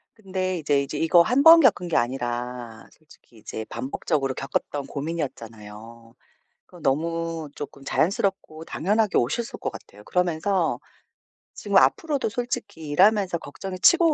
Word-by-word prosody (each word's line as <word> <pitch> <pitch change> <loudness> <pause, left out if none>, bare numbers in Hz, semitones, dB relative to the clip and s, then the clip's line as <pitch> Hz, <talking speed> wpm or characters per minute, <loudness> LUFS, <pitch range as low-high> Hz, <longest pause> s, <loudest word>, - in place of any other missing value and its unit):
근데 185 -3 -3
이제, 145 -2 +1
이제 145 +2 -5
이거 165 +3 +5
1 250 +10 +2
번 330 +1 +10
겪은 190 - +3
게 165 - -2
아니라 120 -1 -3
솔직히 150 -6 -22
이제 110 +1 -7
반복적으로 135 0 -2
겪었던 135 +1 -3
고민이었잖아요. 115 -7 -7 0.5
그 - - -17
너무 165 +2 -1
쪼끔 140 -1 -9
자연스럽고 165 0 -1
당연하게 205 +5 +1
오셨을 190 - -2
것 - - -2
같아요. 105 - -13
그러면서 180 0 0 0.7
지금 - - 0
앞으로도 295 -7 +2
솔직히 205 -8 -5
일하면서 190 +3 +3
걱정이 185 +5 -8
치고 335 - +5
160 Hz, 330 characters per minute, -24 LUFS, 135-195 Hz, 0.7 s, 번